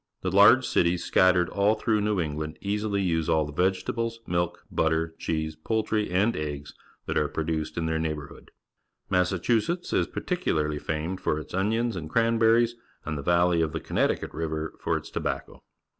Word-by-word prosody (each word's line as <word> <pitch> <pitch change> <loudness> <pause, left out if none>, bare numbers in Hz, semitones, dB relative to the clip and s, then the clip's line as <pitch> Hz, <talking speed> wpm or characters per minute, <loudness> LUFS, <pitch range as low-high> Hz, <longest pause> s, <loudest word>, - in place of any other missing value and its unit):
The 90 - -2
large 105 +6 +7
cities 85 0 +1
scattered 90 -2 +4
all 100 +2 +2
through 110 -1 +1
New 105 -2 0
England 75 -1 -3
easily 100 0 -1
use 80 -3 0
all 80 -1 +3
the 75 - -7
vegetables, 95 +7 -1
milk, 85 0 -2
butter, 80 0 +1
cheese, 80 -1 -2
poultrj^ 110 +5 -1
and 100 +6 +2
eggs 75 -2 -5 0.3
that - - 0
are 75 - +1
produced 80 +1 -3
in 85 - -1
their 80 0 0
neighbour 75 -2 -2
hood. - - -15 0.6
Massachusetts 105 - +1
is - - +2
particularly 75 - -1
famed 80 +6 -3
for 75 - 0
its 75 - -10
onions 110 +4 0
and 80 -4 -5
cranberries, 115 +2 +3 0.3
and 80 - -3
the 70 - -4
valley 85 +2 +3
of 80 0 -1
the 80 - -2
Connecticut - - -1
River 80 -1 -3
for - - 0
its - - -9
tobacco. - - -4
85 Hz, 170 wpm, -27 LUFS, 80-105 Hz, 0.6 s, large